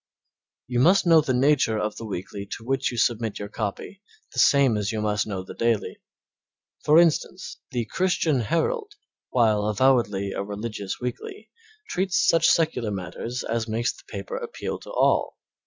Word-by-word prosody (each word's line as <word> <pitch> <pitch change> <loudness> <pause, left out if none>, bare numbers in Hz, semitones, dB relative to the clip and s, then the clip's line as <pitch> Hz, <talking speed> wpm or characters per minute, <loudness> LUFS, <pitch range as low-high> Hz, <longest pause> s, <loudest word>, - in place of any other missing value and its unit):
You 125 -1 -1
must 185 +9 +5
know 165 -2 +6
the 145 - -2
nature 130 -3 +3
of 105 0 -2
the 115 - -6
weekly 100 +1 -6
to 115 - -15
which 135 +2 0
you 120 - -6
submit 115 -2 0
your 100 - -6
copy 110 - -5 0.3
the - - -3
same 140 -5 +5
as 105 +1 -1
you 110 - -3
must 105 -1 0
know 95 -3 -4
the - - -10
daily. 115 -2 -1 0.8
For 150 +1 +5
instance, 175 +2 +1
the 120 -3 -2
Christian 165 - +1
Herald, 410 - -1 0.4
while 110 -4 +2
avowedly 105 -4 +2
a - - -3
religious 105 -1 -5
weekly, 125 - -6 0.4
treats 185 0 0
such 165 0 +4
secular 155 -9 +1
matter 90 -3 -6 0.2
as 115 0 -1
makes 115 +2 -1
the - - -16
paper - - -6
appeal 475 -1 -5
to - - -13
all. - - +1
120 Hz, 165 wpm, -25 LUFS, 105-160 Hz, 0.8 s, know